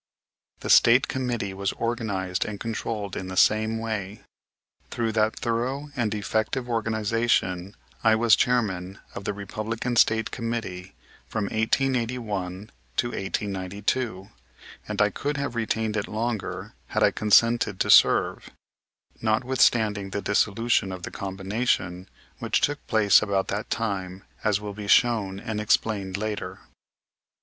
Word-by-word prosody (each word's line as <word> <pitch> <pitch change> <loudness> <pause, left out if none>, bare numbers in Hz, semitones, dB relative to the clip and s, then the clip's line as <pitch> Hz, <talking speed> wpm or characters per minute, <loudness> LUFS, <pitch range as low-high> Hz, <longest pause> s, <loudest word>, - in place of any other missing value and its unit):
The - - -5
State 120 +3 +6
committee 120 -7 -2
was 95 0 -2
organized 100 -6 -2
and 105 -2 -6
controlled 110 -3 -4
in 95 - -4
the 95 0 -6
same 110 +2 +3
way. 110 -3 -4 0.7
Through 115 -1 -1
that 110 0 +1
thorough 130 +5 -2
and 110 -5 0
effective 110 +4 -1
organization 110 -4 0 0.3
I 110 -1 +5
was 110 -2 +5
Chairman 100 -6 0 0.2
of 100 - -7
the 105 - -1
Republican 110 +4 -4
State 110 0 +3
Committee 115 -6 -4 0.3
from 110 - -2
1881 110 -4 -1 0.3
to 120 - +1
1892, 100 +1 -3 0.6
and - - -4
I - - +4
could 145 0 -3
have 140 -3 -2
retained 110 -1 -1
it 105 - -1
longer 110 0 -3
had - - 0
I - - +5
consented 105 -1 +3
to - - +3
serve; - - +5 0.7
notwithstanding 110 -3 +2
the 100 +1 -3
dissolution 100 +1 +1
of 90 -1 -7
the - - -5
combination, 95 -1 -2 0.3
which - - +1
took 145 0 -1
place 105 -4 +5
about 100 -2 0
that 105 +2 -3
time, 95 -4 -3 0.2
as 105 -2 +2
will 105 -1 -6
be 105 0 -7
shown 105 -4 +3
and 105 0 -4
explained 100 -3 0
later. 105 0 -4
110 Hz, 130 wpm, -25 LUFS, 100-115 Hz, 0.7 s, State